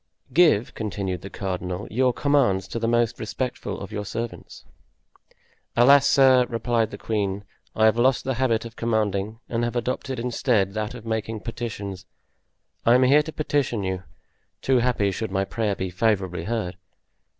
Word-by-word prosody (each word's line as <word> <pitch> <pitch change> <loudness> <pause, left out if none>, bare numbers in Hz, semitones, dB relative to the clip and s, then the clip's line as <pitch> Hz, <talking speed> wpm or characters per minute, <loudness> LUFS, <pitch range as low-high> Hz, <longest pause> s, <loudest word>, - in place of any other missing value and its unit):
"Give," 155 -10 +4
continued 100 -4 -3
the 95 - -8
cardinal, 90 -1 -4
"your 125 +3 +3
commands 125 -10 +2
to 115 - -3
the 115 - -1
most 120 -1 +1
respectful 110 -3 -4
of 100 - -8
your 105 -1 -3
servants." 115 +3 -6 1.1
"Alas, 140 +3 +7
sir," 130 -2 +5
replied 115 -1 0
the - - -8
queen, 100 -2 -2 0.3
"I 110 - +4
have 110 +1 +4
lost 130 +1 +3
the 130 - -1
habit 120 -3 0
of 115 0 -9
commanding 110 -2 -1
and 115 0 -1
have 120 +1 -2
adopted 125 +2 -2
instead 115 -5 +1
that 110 +2 -3
of 115 -2 -10
making 110 -1 -3
petitions. 100 -5 -6 0.8
I 115 - +5
am 130 - +5
here 140 +4 +6
to 160 - -6
petition 145 -8 -1
you, 95 -1 -2 0.6
too 130 -2 +3
happy 115 -5 +1
should 110 +4 -3
my 95 0 0
prayer 105 -1 -1
be 95 -1 -4
favorably 95 -4 0
heard." 100 -6 -3
115 Hz, 160 wpm, -24 LUFS, 100-125 Hz, 1.1 s, Alas